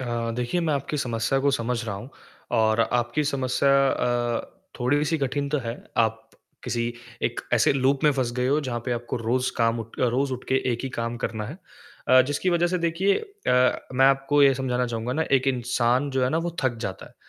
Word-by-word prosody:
अ, 120 -2 -2
देखिए 125 +8 -1
मैं 160 -3 +1
आपकी 140 +2 -3
समस्या 120 -1 0
को 140 - +3
समझ 120 -2 -1
रहा 105 -3 -3
हूँ 105 +7 -8 0.5
और 110 0 +3
आपकी 120 +5 0
समस्या 140 -1 +1 0.2
अ, 120 -1 0 0.4
थोड़ी-सी 145 +5 +1
कठिन 140 +1 -1
तो 150 +1 0
है 115 -3 -4 0.2
आप 110 -1 +1 0.4
किसी 120 0 -1 0.3
एक - - -1
एसे - - +4
लूप 135 0 +1
में 150 - +6
फँस 130 -3 -1
गए 125 - +1
हो 145 +3 +2
जहाँ 120 -1 -2
पे 125 - -1
आपको 120 +1 -3
रोज़ 125 +2 0
काम 115 0 +2
उठ 115 - -7
क 125 - +3
रोज़ 135 +1 0
उठ 130 - -5
के - - +1 0.2
एक 115 - -3
ही - - -2
काम 115 0 -2
करना 110 -1 -3
है 150 - -8 0.5
अ, 130 0 +8
जिसकी 145 +7 -1
वज़ह 175 0 +2
से - - +1
देखिए 190 +4 +2
अ, 130 - 0
मैं 130 +1 +4
आपको 135 +1 +3
ये 135 -1 +6
समझाना 125 -1 -1
चाहूँगा 115 +1 -3
ना 155 +4 0 0.2
एक 130 - -7
इंसान 125 +1 +1
जो 130 -1 +1
है 125 - 0
ना 160 - +1
वो 170 0 -5
थक 130 -3 +1
जाता 95 -1 -7
है। - - -18
125 Hz, 215 wpm, -25 LUFS, 120-140 Hz, 0.5 s, अ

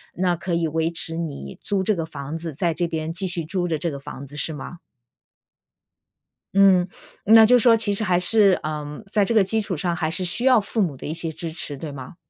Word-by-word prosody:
那 180 -1 +1
可 175 +1 -4
以 170 -1 0
维 160 +1 -1
持 165 -1 +3
你 145 - -6
租 195 -2 -1
这 215 +2 +1
个 165 -2 -3
房 145 0 -7
子 165 -1 -5
在 170 +2 0
这 170 +2 -1
边 160 0 -4
继 185 +2 -1
续 175 -2 -3
租着 175 -1 -2
这 165 +2 -3
个 140 - -7
房 140 0 -9
子 140 +2 -13
是 150 +2 -2
吗？ 160 +4 -9 1.7
嗯， 190 -2 +5 0.4
那 225 +1 +8
就 250 +3 +5
是 - - 0
说 235 -2 +6
其 215 -2 +1
实 200 - -1
还 180 -3 +2
是 200 +1 +4
嗯， 150 +2 -5
在 210 -2 +3
这 230 +4 -1
个 210 - +6
基 220 +4 0
础 190 -4 -4
上 170 +3 -1
还 160 -2 -2
是 185 +3 -2
需 235 +8 -2
要 255 -3 +6
父 215 +2 -2
母 155 -8 -1
的 - - -9
一 155 - -3
些 165 -1 -3
支 165 +1 -6
持， 150 -3 -5
对 150 +2 -7
吗？ 135 +2 -10
170 Hz, 260 characters per minute, -22 LUFS, 155-195 Hz, 1.7 s, 那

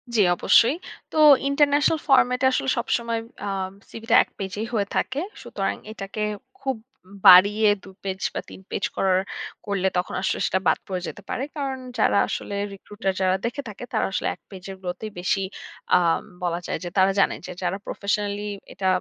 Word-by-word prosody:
জি, 215 - +5
অবশ্যই। 235 - +5 0.4
তো - - -4 0.3
ইন্টারন্যাশনাল 290 +2 +3
ফরম্যাটে 255 -2 +4
আসলে 265 - 0
সবসময় 235 -1 0 0.3
আ - - -3 0.4
সিভি 225 0 -9
টা - - +7
১ - - -22
পেজেই 200 +2 -3
হয়ে 205 -3 +1
থাকে। 265 - 0 0.2
সুতরাং 205 -5 -2 0.2
এইটাকে 200 -1 -7 0.4
খুব 265 -1 -1 0.5
বাড়িয়ে 205 +4 +8
২ - - -11
পেজ 190 -1 -3
বা - - -2
৩ - - -11
পেজ 195 - -3
করার 185 -1 +3 0.5
করলে 200 -2 0
তখন 180 - -1
আসলে 190 - 0
সেটা 190 - +1
বাদ - - +4
পড়ে 185 -2 -3
যেতে 205 - -7
পারে। 255 - -2
কারণ 270 -3 -3 0.2
যারা 215 - +3
আসলে 200 - -4 0.2
recruiter 195 0 -3
যারা 185 0 +3
দেখে 240 +4 -2
থাকে, 210 - -9
তারা 220 - +2
আসলে - - -1
১ - - -35
পেজের 190 0 -8
গুলোতেই 190 +4 -5
বেশি 185 +2 +1 0.5
আম 170 -2 +3 0.2
বলা 175 -1 0
যায় - - -1
যে 175 - -4
তারা 190 +1 +5
জানে - - +3
যে - - -6
যারা 180 +2 0
প্রফেশনালি 205 0 -2 0.3
এটা 190 - -2
205 Hz, 175 wpm, -24 LUFS, 190-235 Hz, 0.5 s, বাড়িয়ে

